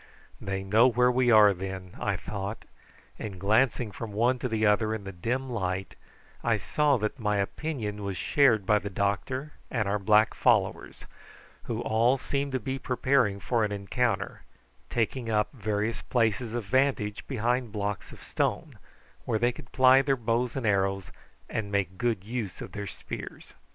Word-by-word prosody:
They 95 -1 -3
know 110 +6 +5
where 125 0 +3
we 125 0 +2
are 105 -3 +7
then, 95 0 -6
I - - 0
thought; 100 +1 -5 0.5
and 95 -3 -6
glancing 110 +3 +2
from 110 +1 -7
one 120 +4 +2
to 125 - -2
the 110 -1 +1
other 110 +1 +2
in 105 - -7
the 95 - -6
dim 120 +9 -2
light 95 -5 -3 0.5
I 115 -2 +2
saw 145 +7 +2
that 105 +4 -3
my 105 -2 0
opinion 105 -1 -3
was 100 -2 -3
shared 125 -9 +3
by 105 +2 +4
the 100 - -5
doctor 100 +9 -2 0.2
and 110 -5 -1
our 105 +1 0
black 105 +2 +4
followers, - - +1 0.6
who - - -3
all 115 +4 +2
seemed 140 +1 -2
to 130 - +1
be 130 +4 -4
preparing 125 -6 +1
for 115 +1 0
an 105 - -1
encounter, 105 +5 -1 0.5
taking 120 +1 -1
up 105 -1 +1
various 110 -1 -2
places 115 -1 0
of 120 -3 -3
vantage 125 -3 0
behind 120 -1 -1
blocks 100 -2 -3
of - - -13
stone, - - -2 0.5
where 110 - +1
they 120 +2 +2
could 120 0 -13
ply 130 0 +6
their 135 -1 +1
bows 120 +1 -1
and 130 -3 -2
arrows 95 -2 0 0.4
and 100 -2 -3
make 95 -2 -1
good 115 -6 0
use 110 -3 -4
of - - -7
their 100 0 -5
spears. - - -8
110 Hz, 170 wpm, -28 LUFS, 100-125 Hz, 0.6 s, are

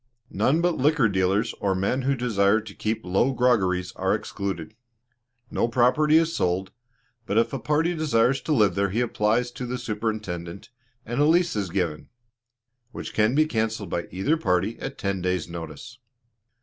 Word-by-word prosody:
None 130 - +2
but 175 -1 +1
liquor 145 -2 +3
dealers 95 +3 +1
or 95 -1 0
men 100 +8 0
who 135 +2 +1
desire 110 -4 +2
to 110 -2 -10
keep 110 0 -3
low 95 +9 +2
groggeries 95 -8 +1
are - - +1
excluded. 95 -1 -5 0.8
No - - +1
property 130 +6 +3
is 165 0 +1
sold, 90 +2 -1 0.6
but 100 - 0
if 115 +2 +2
a 135 - -2
party 155 +6 +1
desires 135 -5 +2
to - - -4
live 110 -9 +4
there 100 0 0
he 110 +6 0
applies 120 +1 +1
to 125 - -6
the 125 +1 -3
Superintendent, 105 -5 -4 0.3
and 120 +5 -1
a - - +5
lease 170 0 +3
is 100 -3 -2
given, 85 -4 -2 0.8
which - - -7
can 110 +4 +2
be 155 +1 +4
cancelled 110 - -2
by 85 - -2
either 130 - 0
party 95 - 0
at 135 - -6
ten 100 -2 -2
days' 90 -2 -1
notice. 85 +9 -8
110 Hz, 170 wpm, -25 LUFS, 95-130 Hz, 0.8 s, a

